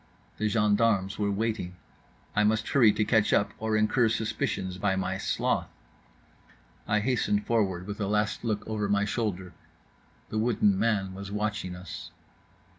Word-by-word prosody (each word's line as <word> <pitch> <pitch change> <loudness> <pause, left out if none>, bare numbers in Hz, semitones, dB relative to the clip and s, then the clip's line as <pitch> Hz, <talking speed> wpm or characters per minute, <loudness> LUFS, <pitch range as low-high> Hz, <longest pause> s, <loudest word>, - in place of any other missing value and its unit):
The 110 - +1
gendarmes 105 -1 +2
were 100 -1 +1
waiting. 100 -3 -2 0.6
I 105 - +4
must 110 +1 +1
hurry 120 -6 +6
to 105 +1 0
catch 110 -2 +3
up 100 - +2
or 110 0 0
incur 110 +2 +3
suspicions 95 -4 -2
by 95 0 +1
my 95 0 -2
sloth. - - 0 1.2
I 105 +1 +2
hastened 105 -4 +1
forward, 95 -6 0
with 105 +1 -6
a 100 - 0
last 105 +1 0
look 110 -3 -2
over 105 -2 -2
my 100 0 +2
shoulder… 95 -5 -3 0.8
the 110 - -1
wooden 105 -4 +2
man 100 -4 +1
was 100 +1 -7
watching 105 -3 -2
us. 90 -1 -8
105 Hz, 150 wpm, -28 LUFS, 100-110 Hz, 1.2 s, hurry